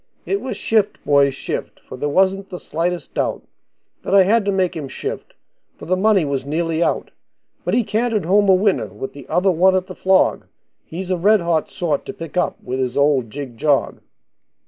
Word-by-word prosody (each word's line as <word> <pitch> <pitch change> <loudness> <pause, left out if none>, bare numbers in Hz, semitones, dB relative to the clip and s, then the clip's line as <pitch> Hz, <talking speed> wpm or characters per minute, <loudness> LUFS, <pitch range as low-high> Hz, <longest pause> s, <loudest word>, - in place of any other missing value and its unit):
It 395 +1 -1
was 265 - -5
shift, 215 -2 +1
boys, 140 -2 +3
shift, - - -5
for - - -11
there 145 +3 -2
wasn't 190 +4 +1
the 180 - -7
slightest 175 +2 -3
doubt - - -2 0.6
That - - 0
I 195 - +8
had 210 +3 +2
to 200 - +1
make 190 -2 0
him 150 -4 -5
shift, - - -6 0.4
for - - -10
the 185 - +1
money 195 -2 +3
was 140 -2 -2
nearly 165 +3 -1
out; - - 0 0.5
But 180 - 0
he 240 - +3
cantered 220 -1 -1
home 200 +3 +3
a 190 - +7
winner, 195 +1 +1
with 135 - -7
the 140 -3 -12
other 180 +4 +2
one 185 +2 +4
at 185 -1 0
the 185 - -9
flog 190 +1 +2 0.4
He's 185 +3 -6
a 185 - +1
red 205 +3 +4
hot 170 -2 0
sort 155 -5 -2
to - - -5
pick 165 -1 -9
up 180 - 0
with 130 +1 -3
his 130 0 -2
old 140 -5 +2
jig 130 -1 -7
jog. 145 +2 +1
180 Hz, 205 wpm, -20 LUFS, 145-195 Hz, 0.6 s, I